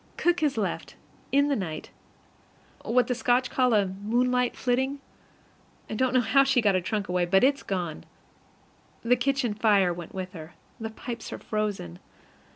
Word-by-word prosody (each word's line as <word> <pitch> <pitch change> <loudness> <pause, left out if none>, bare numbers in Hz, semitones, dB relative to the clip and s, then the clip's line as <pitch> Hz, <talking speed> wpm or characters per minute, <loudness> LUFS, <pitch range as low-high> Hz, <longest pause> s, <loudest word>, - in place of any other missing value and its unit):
Cook 350 0 +2
has 295 -6 0
left, 210 - -3 0.4
in 280 +1 +4
the 285 - +1
night, 160 -8 -5 0.9
what 250 +2 +2
the 250 - -1
Scotch 245 +1 +1
call 250 -3 +3
a 205 -2 +4
"moonlight 240 +6 0
flitting." 265 +3 0 0.9
I - - -2
don't 255 +3 +1
know 255 - +5
how 275 +4 +4
she 270 -2 +3
got 210 -4 +3
her 185 - +1
trunk 205 +3 -2
away, 180 0 +1
but 190 +4 +4
it's 275 +1 +3
gone. 175 -5 -4 1.0
The 240 +2 +4
kitchen 255 -2 0
fire 205 -4 +3
went 170 +1 -9
with 185 -1 -5
her. 160 0 -10 0.2
The 220 -1 -4
pipes 235 +1 -7
are - - -5
frozen. 205 - -3
225 Hz, 165 wpm, -27 LUFS, 190-255 Hz, 1.0 s, know